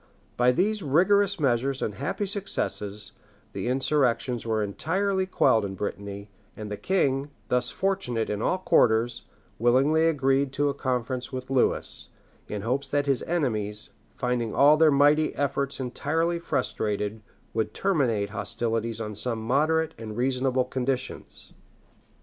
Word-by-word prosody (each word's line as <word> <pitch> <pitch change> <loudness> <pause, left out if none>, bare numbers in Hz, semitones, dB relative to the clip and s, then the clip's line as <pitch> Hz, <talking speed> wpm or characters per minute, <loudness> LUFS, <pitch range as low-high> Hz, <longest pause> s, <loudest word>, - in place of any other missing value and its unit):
By 125 +1 +4
these 205 +9 +1
rigorous 190 +6 +3
measures 135 -1 +1
and 105 - -2
happy 140 - -3
successes, 105 - -2 0.4
the - - -4
insurrections 125 -3 +1
were 110 -1 +1
entirely 190 - -1
quelled 110 - +3
in 95 -1 -4
Brittany; 100 +1 -5 0.3
and 105 -1 -6
the - - -2
king, 140 - 0 0.2
thus 125 0 +1
fortunate 190 - -1
in 105 0 -3
all 185 - +1
quarters, 120 -9 +2 0.3
willingly 135 +7 +4
agreed 135 -3 +1
to 145 +1 +1
a - - -1
conference 125 -2 -2
with 130 0 -6
Lewis, 130 -2 0 0.4
in 105 -1 -5
hopes 125 +5 -1
that 145 0 +1
his 135 -3 +1
enemies, 110 -11 -2 0.2
finding 120 -3 -1
all 145 +2 +7
their 160 0 +5
mighty 145 +2 +4
efforts 140 -1 -1
entirely 160 +7 -1
frustrated, 105 -8 -2 0.3
would 110 -1 -1
terminate 120 - +1
hostilities 115 +2 -2
on 105 -1 -4
some 115 +3 -1
moderate 155 +6 +2
and 110 -1 -7
reasonable 130 0 +1
conditions. 130 0 -3
130 Hz, 135 wpm, -26 LUFS, 115-150 Hz, 0.4 s, all